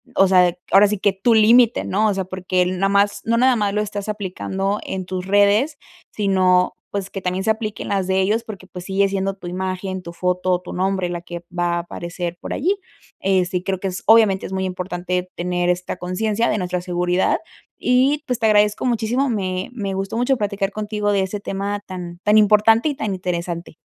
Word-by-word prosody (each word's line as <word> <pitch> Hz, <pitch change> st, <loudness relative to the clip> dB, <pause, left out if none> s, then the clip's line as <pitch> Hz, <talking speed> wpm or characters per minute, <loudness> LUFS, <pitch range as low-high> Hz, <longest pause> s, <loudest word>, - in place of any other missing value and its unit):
O 195 Hz, -, +5 dB
sea, 180 Hz, -2 st, +4 dB, 0.2 s
ahora 200 Hz, +1 st, +7 dB
sí 210 Hz, -1 st, -2 dB
que 200 Hz, -, +3 dB
tu 205 Hz, +5 st, +2 dB
límite, 230 Hz, +2 st, +5 dB
¿no? 215 Hz, +3 st, +1 dB
O 205 Hz, -, +2 dB
sea, 190 Hz, -1 st, -2 dB
porque 185 Hz, 0 st, -1 dB
el 180 Hz, 0 st, 0 dB
no 195 Hz, -, +2 dB
más 200 Hz, 0 st, +2 dB
no 230 Hz, +1 st, +2 dB
nada 255 Hz, 0 st, +4 dB
más 205 Hz, -1 st, 0 dB
lo 210 Hz, -, +1 dB
estás 205 Hz, -1 st, -4 dB
aplicando 195 Hz, 0 st, -2 dB
en 190 Hz, -1 st, -4 dB
tus 185 Hz, 0 st, -4 dB
redes, 205 Hz, +9 st, +3 dB, 0.3 s
sino, 185 Hz, -3 st, +2 dB
pues, 200 Hz, -1 st, -4 dB
que 195 Hz, -, -5 dB
también 180 Hz, +1 st, -2 dB
se 220 Hz, -, +3 dB
aplique 215 Hz, -1 st, -4 dB
en -, -, -7 dB
las 195 Hz, -2 st, 0 dB
de 190 Hz, 0 st, +2 dB
ellos, 210 Hz, +4 st, +1 dB
porque 210 Hz, -4 st, -9 dB
pues 180 Hz, -1 st, -9 dB
sigue 195 Hz, 0 st, +2 dB
siendo 195 Hz, 0 st, -2 dB
tu 190 Hz, -, -13 dB
imagen, 185 Hz, +1 st, -3 dB
tu 170 Hz, -1 st, -8 dB
foto, 180 Hz, +1 st, 0 dB
tu -, -, -8 dB
nombre, 185 Hz, -1 st, 0 dB
la 175 Hz, -1 st, -4 dB
que 175 Hz, -1 st, -8 dB
va 175 Hz, 0 st, +1 dB
a -, -, 0 dB
aparecer 175 Hz, 0 st, -5 dB
por -, -, -5 dB
allí. 385 Hz, +8 st, 0 dB, 0.4 s
Eh, 190 Hz, -2 st, +2 dB
sí, 180 Hz, 0 st, -2 dB
creo 190 Hz, 0 st, -2 dB
que 195 Hz, -, -2 dB
es, 185 Hz, -, -6 dB
obviamente, 220 Hz, -4 st, +5 dB
es -, -, -8 dB
muy 190 Hz, 0 st, -1 dB
importante 180 Hz, 0 st, -3 dB
tener 175 Hz, 0 st, -1 dB
esta 180 Hz, +1 st, -2 dB
conciencia 210 Hz, +5 st, -1 dB
de 215 Hz, -, +1 dB
nuestra 180 Hz, -1 st, -2 dB
seguridad 180 Hz, 0 st, +1 dB, 0.4 s
y 265 Hz, +4 st, +2 dB
pues 250 Hz, -4 st, -2 dB
te 220 Hz, -, +2 dB
agradezco 210 Hz, +2 st, +3 dB
muchísimo. 245 Hz, +3 st, 0 dB
Me 185 Hz, -5 st, -2 dB
me 200 Hz, -5 st, -3 dB
gustó 195 Hz, +3 st, -3 dB
mucho 250 Hz, +2 st, +2 dB
platicar 200 Hz, -1 st, -2 dB
contigo 210 Hz, 0 st, -2 dB
de 200 Hz, -1 st, +2 dB
ese 190 Hz, +2 st, -3 dB
tema 200 Hz, +1 st, -3 dB
tan 175 Hz, -2 st, -7 dB
tan 210 Hz, +1 st, +4 dB
importante 215 Hz, +5 st, +4 dB
y 290 Hz, -, -3 dB
tan 215 Hz, -5 st, -3 dB
interesante. 175 Hz, -2 st, -4 dB
195 Hz, 215 wpm, -21 LUFS, 180-210 Hz, 0.4 s, ahora